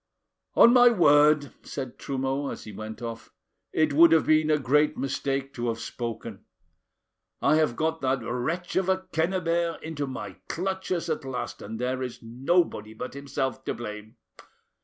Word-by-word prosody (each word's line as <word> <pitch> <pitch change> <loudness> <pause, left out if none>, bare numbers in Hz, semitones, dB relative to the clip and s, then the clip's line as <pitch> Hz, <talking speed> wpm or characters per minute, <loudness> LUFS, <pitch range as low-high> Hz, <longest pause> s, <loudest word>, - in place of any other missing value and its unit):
"On 235 - +8
my 245 -1 +8
word," 150 - +4
said 130 -3 -7
Trumeau, 135 +1 -2
as - - -7
he 110 - -9
went 110 +3 -8
off, 115 -1 -7 0.4
"it 155 -2 +2
would 165 +3 +7
have 160 - +4
been 155 0 +3
a 155 - +4
great 150 +2 +2
mistake 135 0 -2
to 120 0 -3
have 115 -1 -1
spoken. 115 -2 -6 1.0
I 155 - +3
have 155 -7 +2
got 160 +2 -1
that 130 -2 0
wretch 155 - -3
of 190 0 +1
a 190 - +3 0.2
Quennebert 170 0 0
into 150 -3 -4
my 105 -7 -7
clutches 190 -1 -2
at - - -2
last; 130 -2 -5
and 110 +2 -6
there 130 +2 -2
is 125 -2 -4
nobody 120 - 0
but 125 - -6
himself 135 -1 -3
to - - -2
blame. 105 0 -8
140 Hz, 160 wpm, -27 LUFS, 125-160 Hz, 1.0 s, On